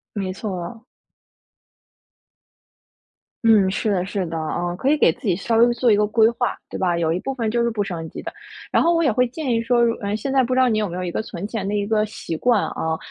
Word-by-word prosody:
没 190 -2 -3
错。 195 +2 -6 2.6
嗯， 215 -4 +5
是 205 +2 -1
的， 185 -3 +1
是 195 -1 -2
的， 165 -1 -5
啊， 175 +2 -2
可 260 +9 0
以 305 - +4
给 - - +4
自 - - -24
己 185 - +3
稍 225 +5 -1
微 240 +1 +5
做 240 -1 +3
一 - - +6
个 210 0 +2
规 220 +1 +4
划， 245 +1 -2
对 - - -5
吧？ 175 -2 +1
有 165 -1 +1
一 175 - -1
部 270 +6 -4
分 230 -4 -1
就 235 +1 +1
是 235 - +2
不 215 -3 -1
升 165 -4 -5
级 - - -9
的。 - - -6 0.4
然 - - +3
后 340 +1 +3
我 335 - +2
也 280 - +3
会 250 +3 +2
建 265 +2 -4
议 230 -1 +1
说 240 +1 +2
如 230 - +2
嗯， 205 0 -2
现 265 +5 -3
在 265 -1 +4
不 255 +1 -1
知 - - +3
道 255 - +5
你 220 -3 +1
有 210 -2 -1
没 175 - -5
有 185 - -3
一 175 - -3
个 - - -2
存 195 -2 -6
钱 210 -3 -4
的 205 - -1
一 205 -1 0
个 215 0 +1
习 185 -5 -6
惯 230 +5 +2
啊？ 160 0 -2
215 Hz, 280 characters per minute, -22 LUFS, 185-235 Hz, 2.6 s, 一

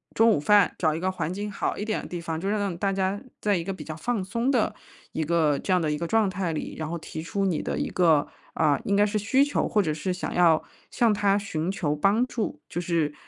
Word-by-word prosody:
中 225 +1 +5
午 205 - +2
饭。 205 +6 +4
找 155 -3 +2
一 - - -3
个 185 +2 0
环 180 -3 -3
境 205 +3 -4
好 - - -2
一 205 - -3
点 215 -1 -1
的 - - -9
地 175 - -5
方， 165 -1 -4
就 195 - -3
让 210 +1 0
那 205 - 0
种 180 - -4
大 195 +3 0
家 195 +1 -1 0.2
在 205 -1 +1
一 170 - -1
个 195 - -3
比 190 - -7
较 155 - -6
放 205 +6 -2
松 230 +7 -1
的 250 -5 +2 0.4
一 160 - -2
个 155 -3 +2
这 - - -3
样 185 - +4
的 155 -3 0
一 150 - -2
个 170 - -2
状 220 +2 +3
态 190 -2 -2
里， 155 - -4
然 155 -1 -3
后 170 - -3
提 160 -1 -7
出 195 +4 -2
你 180 -5 0
的 - - -3
一 - - -1
个， 160 -5 +3 0.3
呃， 150 -3 +3
应 200 - +1
该 205 +1 +5
是 210 +1 -1
需 260 +7 +3
求 290 - 0
或 210 -2 +2
者 155 -4 -1
是 155 +5 -3
想 180 - -4
要 165 -3 +4 0.3
向 230 -3 +2
他 200 -1 +2
寻 180 -5 -3
求 160 -6 -1
帮 200 +10 +3
助， 230 -10 -4
就 175 - -3
是， 165 -4 0
185 Hz, 295 characters per minute, -26 LUFS, 160-205 Hz, 0.4 s, 中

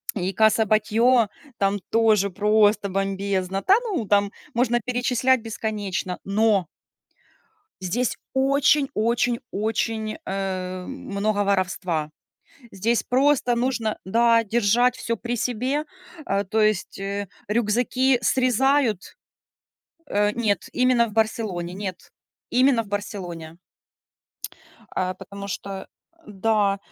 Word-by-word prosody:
И 190 -2 -1
Каса 220 +2 +4
Батльо 220 +2 +3 0.3
там 200 0 +1
тоже 215 -3 +3
просто 210 +1 +3
бомбезно. 195 0 -2
Та 380 - +4
ну, 385 - -2
там 200 0 +2 0.2
можно 240 0 +2
перечислять 250 +1 +1
бесконечно, 205 -4 -4
но 200 -2 +2 1.1
здесь 225 +7 -1 0.2
очень-очень-очень, 235 -5 0
э, 185 -1 -3
много 205 +1 -2
воровства. 180 -5 -1 0.6
Здесь 220 +5 0
просто 255 -1 +2
нужно, 235 -3 -1
да, 230 +3 +3
держать 235 +3 +2
всё 230 - -2
при 240 0 -3
себе. 255 +6 -1 0.4
Э, 200 +1 0
то 215 +3 0
есть, 215 -2 0
э, 200 +1 -3 0.2
рюкзаки 240 +4 +1
срезают 255 -3 +1 0.9
Э, 205 +1 +1
нет, 210 -5 0
именно 250 -2 +3
в 215 - -9
Барселоне, 210 -5 -1
нет, 190 -2 -6 0.4
именно 255 -1 +3
в 210 - -15
Барселоне. 175 -6 -5 1.4
Э, 185 0 -1
потому 200 0 -8
что, 200 +1 -5
э 190 -1 -6 0.4
да, 205 0 +1
215 Hz, 105 wpm, -24 LUFS, 195-240 Hz, 1.4 s, Каса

